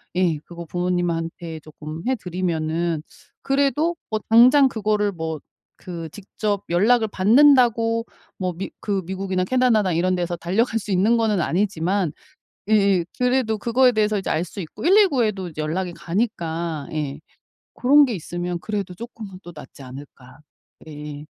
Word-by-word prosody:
예 175 -4 +2
그거 170 -1 -9
부모님한테 170 -2 -2
쪼끔 155 +1 -9
해 260 - +2
드리면은 170 -4 -2 0.4
그래도 285 +5 +1 0.2
뭐 215 - 0
당장 255 +5 +7
그거를 210 -3 0
뭐 160 -2 -4 0.4
그 170 -2 -7
직접 205 0 -3
연락을 220 +6 +3
받는다고 230 +1 +4 0.3
뭐 185 -2 -2
미 190 +4 -5
그 200 -2 -1
미국이나 190 0 -2
캐나다나 220 -3 +2
이런 180 +3 +1
데서 175 -1 -2
달려갈 225 +7 0
수 210 - -10
있는 210 +6 +3
거는 215 -5 +1
아니지만 185 -1 0 0.6
예예 200 -5 +3
그래도 250 -3 +1
그거에 250 +4 +3
대해서 215 -2 +1
이제 195 - -3
알 160 +2 0
수 180 - -8
있고 160 - -8
119 370 - +5
에도 195 -4 -2
이제 155 -1 -7
연락이 175 +4 -2
가니까 170 -5 -3
예 150 -2 -3 0.5
고런 285 +3 +5
게 245 - -2
있으면 175 0 -4
그래도 200 -3 -4
쪼끔은 215 -2 -9
또 175 - -10
낫지 150 - -12
않을까. 130 +1 -12 0.5
예예. 150 -1 -8
190 Hz, 310 characters per minute, -22 LUFS, 170-225 Hz, 0.6 s, 당장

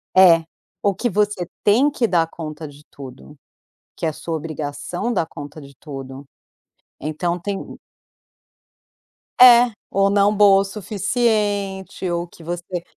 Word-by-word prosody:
É. 175 -3 +7 0.4
O 200 -1 +2
que 240 +6 -2
você 205 -3 0 0.2
tem 240 +8 +4
que 250 -5 0
dar 170 -5 +2
conta 155 -1 -7
de 145 +1 -15
tudo, 135 +2 -12 0.6
que - - -3
é 160 - 0
sua 165 +2 -5
obrigação 155 +7 -4
dar 170 -6 0
conta 145 0 -10
de 140 -1 -14
tudo. 135 -1 -9 0.8
Então 170 +4 -2
tem 195 +2 -6 1.6
É. 245 -1 +8 0.2
Ou 195 0 +2
não 200 +1 +3
boa 200 -1 +6
o - - 0
suficiente 200 -2 -2
ou 170 0 -2
que 170 -1 -16
você 175 +1 -5
180 Hz, 135 wpm, -21 LUFS, 155-205 Hz, 1.6 s, É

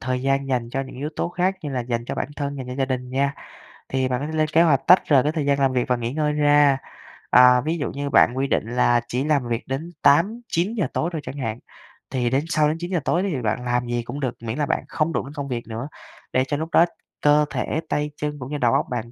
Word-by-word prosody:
thời 125 +1 -2
gian 135 0 0
dành 120 -3 -1
cho 135 +2 -2
những 135 -1 -8
yếu 145 +4 -3
tố - - -1
khác 180 +2 0
như 150 - -4
là 130 -2 -2
dành 120 -1 -3
cho - - -4
bản - - -3
thân, 140 -1 -3
dành 130 - -6
cho 125 - -5
gia 135 - 0
đình 125 -1 -4
nha. 140 +2 0 0.6
Thì 130 -1 0
bạn 125 -1 -1
có 145 - -4
thể 160 - -6
lên 155 0 +1
kế 160 +2 +3
hoạch 145 -5 +4
tách 180 +2 +8
rời 135 -4 +5
cái 150 - +1
thời 155 -3 -2
gian 140 0 +2
làm 135 -1 +2
việc 125 -1 0
và 125 - +2
nghỉ 120 0 -3
ngơi 150 0 0
ra, 145 -2 +4 0.5
à, 125 0 +7
ví 160 +3 -2
dụ 145 - -3
như 140 0 -4
bạn 125 - +5
quy 135 - 0
định - - +1
là 120 -1 +3
chỉ 125 +2 -1
làm 145 -4 +1
việc 120 0 -3
đến 145 +6 -4
8:00-9:00 200 +4 +2
tối 165 - 0
thôi 160 - -3
chẳng 140 - -7
hạn, 115 -3 -3 0.5
thì 125 -2 0
đến 135 +5 0
sau 155 -2 +2
đến 155 +2 -1
9:00 175 0 -1
tối 175 - +1
đi 200 - -1
thì 130 - -3
bạn 115 +2 -2
làm 125 0 0
gì 120 0 -2
cũng 120 +4 -6
được, 130 -4 -2
miễn 115 +2 -4
là 150 - +1
bạn - - -1
không 165 +1 -1
đụng - - -1
đến 140 - -10
công 140 -1 -5
việc 120 -3 -4
nữa 115 +4 -5 0.5
để 130 - +3
cho 145 - -1
lúc 160 +2 -4
đó 170 - +6 0.4
cơ 150 0 +4
thể, 160 - -2
tay 150 0 -1
chân 150 -1 -4
cũng 130 +2 -7
như 150 - -2
đầu 120 -4 +2
óc - - +2
bạn 120 -1 -4
140 Hz, 280 wpm, -23 LUFS, 125-150 Hz, 0.6 s, tách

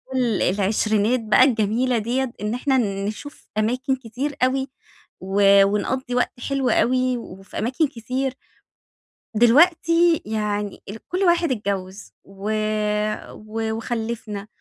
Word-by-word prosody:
ال 240 -5 +1
العشرينات 210 +4 +1
بقى 220 +2 +4
الجميلة 240 0 +2
ديّة، 240 +3 -1
إن 210 +2 -2
إحنا 265 +2 +1 0.3
نشوف 290 +8 -8
أماكن 255 +5 0
كتير 260 +4 -5
أوي، 265 +1 +1 0.5
و 195 +1 +5
ونقضّي 245 +5 -1
وقت 245 0 0
حلو 275 -2 0
أوي، 255 +2 +2
وفي 195 -4 -10
أماكن 260 +7 +1
كتير. 255 +2 -3 1.0
دلوقتي 330 +7 +4
يعني 210 -1 -3
ال 220 +2 -10
كل 360 - -3
واحد 345 -4 +3
اتجوّز 200 -3 -4
و 195 +2 -6 0.8
و 220 +1 -4
وخلّفنا، 220 -3 -4
235 Hz, 115 wpm, -22 LUFS, 210-260 Hz, 1.0 s, و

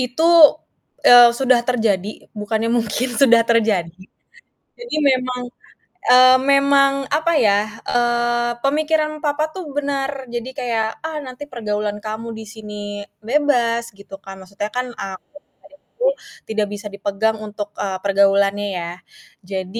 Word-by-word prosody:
Itu, 255 +6 -1 0.8
eee, 245 -1 +9
sudah 255 -2 +3
terjadi 215 -5 -1
bukannya 220 +1 -2
mungkin 235 +1 -1
sudah 235 -4 +6
terjadi. 205 -7 0 0.7
jadi 480 -7 -7
memang, 255 -1 -1 0.7
eee, 255 +1 +7 0.2
memang, 275 0 +4 0.2
apa 310 +3 0
ya, 210 +1 +1
eee, 240 0 0
pemikiran 305 +2 0
papa 300 +1 0
tuh 375 - -5
benar 275 -1 -3
jadi 240 +1 -5
kayak, 230 -3 -1
"Ah, 320 -1 -5
nanti 260 +2 -9
pergaulan 210 -5 -3
kamu 220 +1 -5
di 220 - -8
sini 215 -1 -10 0.5
bebas," 240 -2 +1
gitu 195 -1 -12
kan 195 0 -11
maksudnya 200 +2 -5
kan 250 +3 -4
aku 190 -1 -6
pada 290 - -15
saat - - -24
itu - - -6 0.4
tidak 215 -1 -1
bisa 205 +1 -8
dipegang 200 +2 -1
untuk, 210 -1 -7
eee, 190 -2 -2
pergaulannya 200 +1 +2
ya. 170 0 -5 0.6
Jadi, 190 +3 -4
235 Hz, 135 wpm, -19 LUFS, 210-265 Hz, 0.8 s, eee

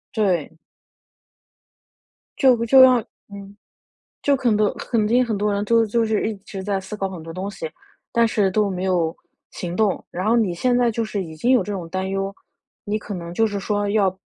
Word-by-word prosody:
对。 180 -8 0 1.8
就 260 -3 +5
就 260 +3 +7
要 255 -1 +6 0.3
嗯。 200 0 -10 0.6
就 285 - +3
很多 215 -4 +2
肯 220 -3 -1
定 245 +3 +3
很 225 -3 -2
多 205 +1 0
人 200 +1 -1
就 230 +1 +4
就 230 +2 +1
是 220 -1 0
一 220 - -4
直 190 0 -7
在 200 0 -1
思 190 +3 -7
考 195 -2 -2
很 180 -4 -8
多 165 0 -8
东 185 +3 -4
西， 345 - -6 0.5
但 235 -1 +4
是 205 -3 +1
都 210 +1 +1
没 185 -1 -4
有 175 -3 0 0.3
行 175 -1 -6
动， 210 -1 0
然 185 +4 -3
后 230 - +4
你 205 -6 +1
现 245 +8 +1
在 240 -1 +3
就 230 +1 -2
是 205 -3 -3
已 160 -2 -9
经 240 +11 +1
有 255 - +4
这 210 - -4
种 175 -4 -6
担 190 +2 -2
忧， 195 0 -2 0.5
你 210 +1 -2
可 205 -1 -6
能 170 -1 -7
就 225 +5 +2
是 205 -1 -3
说 205 +1 -1
要 200 -3 +2
205 Hz, 225 characters per minute, -22 LUFS, 190-225 Hz, 1.8 s, 就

